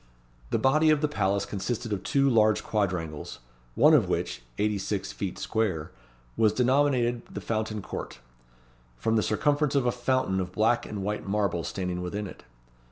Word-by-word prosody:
The - - +1
body 155 +4 +4
of 155 -1 +4
the 150 - +2
palace 100 -8 0
consisted 105 +3 -3
of 95 - -2
two 140 +6 +2
large 110 -4 +3
quadrangles: 90 -8 -2 0.4
one - - +6
of - - +4
which, - - -2 0.2
eighty 105 -1 +1
six 95 0 -3
feet 95 -3 -4
square, 95 -9 -1 0.4
was 110 -1 +3
denominated 125 -1 +2
the - - -5
Fountain 110 -2 -2
Court, - - -6 0.8
from 110 - 0
the 110 - +3
circumstance 145 +7 +1
of 135 -3 +2
a 120 - +3
fountain 125 -5 0
of 90 -1 -4
black 115 +4 +2
and 100 -2 -5
white 105 0 -3
marble 100 -4 0
standing 90 -1 -3
within 100 +4 -3
it. 95 - -10
105 Hz, 165 wpm, -27 LUFS, 95-125 Hz, 0.8 s, one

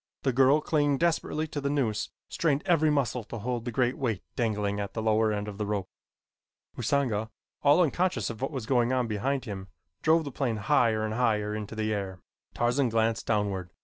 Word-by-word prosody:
The 130 - +1
girl, 135 +4 +5
clinging 145 -3 +2
desperately 160 -1 0
to 145 - -4
the 140 - -1
noose, 125 -7 0 0.2
strained 150 -3 0
every 160 -3 +3
muscle 125 -5 0
to 115 - -7
hold 120 +1 -3
the 120 - -2
great 125 +1 0
weight 115 -8 -1
dangling 105 -4 0
at 100 -1 -4
the 110 - -1
lower 110 0 +3
end 105 0 -2
of 105 -1 -7
the 105 - 0
rope. 100 -3 -2 0.9
Usanga, 120 -3 0 0.3
all 150 +5 +5
unconscious 160 - 0
of 115 - -10
what 135 - 0
was 130 -7 -5
going 120 0 +2
on 130 -1 +1
behind 125 +5 -1
him, 100 -4 -6 0.3
drove 160 +1 +4
the 140 - -6
plane 120 -5 -1
higher 110 -2 +2
and 110 - -2
higher 110 -3 +1
into 105 0 -5
the 110 0 -1
air. 95 -3 -4 0.4
Tarzan 120 +2 +2
glanced 115 0 0
downward. 100 -4 0
115 Hz, 195 wpm, -28 LUFS, 105-140 Hz, 0.9 s, girl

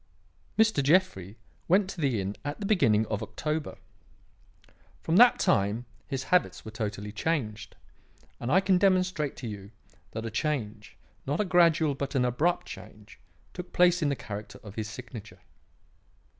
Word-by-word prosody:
Mr. 220 -9 +4
Jeffrey 135 - +1 0.3
went 190 +3 +4
to 185 -3 -6
the 130 -7 +1
inn 100 +2 -3
at 145 0 -4
the 205 - -4
beginning 115 - +3
of 105 0 -3
October. 150 +7 -3 1.3
From 165 +2 +2
that 245 +2 +7
time 100 +5 +1 0.2
his 135 -2 -3
habits 130 - +1
were 110 - -7
totally 105 -1 -4
changed, 110 -5 -3 0.6
and 120 - -3
I 185 - +5
can 190 -1 +3
demonstrate 185 -6 +2
to 125 - -7
you 100 -2 -7 0.4
that 110 +1 -4
a 115 - -4
change 110 -5 -3 0.3
not 145 +3 -1
a 210 - +2
gradual, 170 -4 +4
but 140 +1 -4
an 125 -2 +3
abrupt 150 +9 +1
change 105 +2 -12 0.3
took 180 0 -8
place 180 0 +4
in 150 - +2
the 140 - 0
character 105 -3 -8
of 105 -3 -10
his 110 0 -4
signature. 110 -5 -10
135 Hz, 155 wpm, -28 LUFS, 105-175 Hz, 1.3 s, that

